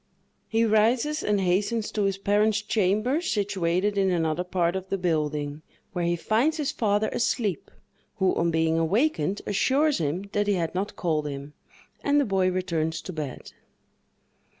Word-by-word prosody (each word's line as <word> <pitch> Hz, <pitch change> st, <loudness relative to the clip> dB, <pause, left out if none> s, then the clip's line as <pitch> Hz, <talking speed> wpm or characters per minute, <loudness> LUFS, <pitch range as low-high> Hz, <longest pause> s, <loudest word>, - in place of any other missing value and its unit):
He 225 Hz, 0 st, +2 dB
rises 230 Hz, +8 st, +2 dB
and 210 Hz, -1 st, +1 dB
hastens 205 Hz, +4 st, 0 dB
to 210 Hz, -2 st, 0 dB
his 195 Hz, -1 st, 0 dB
parent's 205 Hz, +2 st, +2 dB
chamber, 215 Hz, -, +1 dB
situated 200 Hz, -, 0 dB
in 190 Hz, -1 st, +3 dB
another 165 Hz, -1 st, 0 dB
part 180 Hz, -1 st, 0 dB
of 190 Hz, 0 st, -5 dB
the 195 Hz, -, 0 dB
building, 150 Hz, -4 st, -1 dB, 0.3 s
where 175 Hz, -2 st, -1 dB
he 170 Hz, 0 st, +1 dB
finds 235 Hz, -, +1 dB
his 295 Hz, -3 st, -1 dB
father 210 Hz, -1 st, +1 dB
asleep, 215 Hz, -, -1 dB, 0.5 s
who, 190 Hz, -1 st, +2 dB
on 170 Hz, -, +1 dB
being 160 Hz, 0 st, +1 dB
awakened, 195 Hz, -, +1 dB
assures 275 Hz, -, +2 dB
him 160 Hz, +4 st, -1 dB
that 205 Hz, 0 st, 0 dB
he 205 Hz, -, +3 dB
had 165 Hz, -3 st, -2 dB
not 190 Hz, +3 st, -3 dB
called 155 Hz, -4 st, -1 dB
him, 140 Hz, +1 st, -7 dB, 0.5 s
and 285 Hz, +1 st, +3 dB
the 285 Hz, -, +2 dB
boy 190 Hz, -2 st, +2 dB
returns 170 Hz, -3 st, -1 dB
to 185 Hz, -, -6 dB
bed. 150 Hz, -5 st, -6 dB
190 Hz, 160 wpm, -26 LUFS, 170-215 Hz, 0.5 s, in